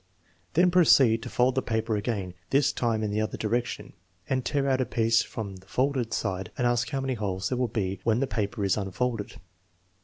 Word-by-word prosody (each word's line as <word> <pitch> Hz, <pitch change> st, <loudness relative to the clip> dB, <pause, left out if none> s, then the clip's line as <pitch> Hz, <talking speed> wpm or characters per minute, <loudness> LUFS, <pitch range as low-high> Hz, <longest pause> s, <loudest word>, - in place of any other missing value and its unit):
9 95 Hz, -, -40 dB, 0.5 s
Then 175 Hz, +2 st, +5 dB
proceed 135 Hz, -10 st, +5 dB
to 120 Hz, -, -6 dB
fold 125 Hz, +2 st, +2 dB
the 130 Hz, -, +1 dB
paper 110 Hz, -2 st, -1 dB
again,, 100 Hz, -4 st, -2 dB, 0.2 s
this 140 Hz, 0 st, +3 dB
time 115 Hz, -3 st, 0 dB
in 105 Hz, -, -1 dB
the 105 Hz, +1 st, 0 dB
other 110 Hz, -, -3 dB
direction, 120 Hz, +2 st, -2 dB, 0.3 s
and 130 Hz, -1 st, 0 dB
tear 140 Hz, 0 st, 0 dB
out 130 Hz, -1 st, +2 dB
a -, -, +1 dB
piece 115 Hz, 0 st, +3 dB
from 100 Hz, -4 st, -6 dB
the 95 Hz, +1 st, -18 dB
folded 130 Hz, -2 st, 0 dB
side 95 Hz, -2 st, -2 dB
and 125 Hz, -, 0 dB
ask 120 Hz, -1 st, +1 dB
how 135 Hz, -, -2 dB
many 135 Hz, -1 st, -1 dB
holes 95 Hz, -5 st, -2 dB
there 125 Hz, -, -1 dB
will 125 Hz, -, +2 dB
be 100 Hz, -4 st, -2 dB
when 115 Hz, 0 st, +2 dB
the 135 Hz, -, +2 dB
paper 105 Hz, -3 st, -2 dB
is 95 Hz, -, +2 dB
unfolded. 105 Hz, +2 st, -2 dB
115 Hz, 215 wpm, -27 LUFS, 105-130 Hz, 0.5 s, Then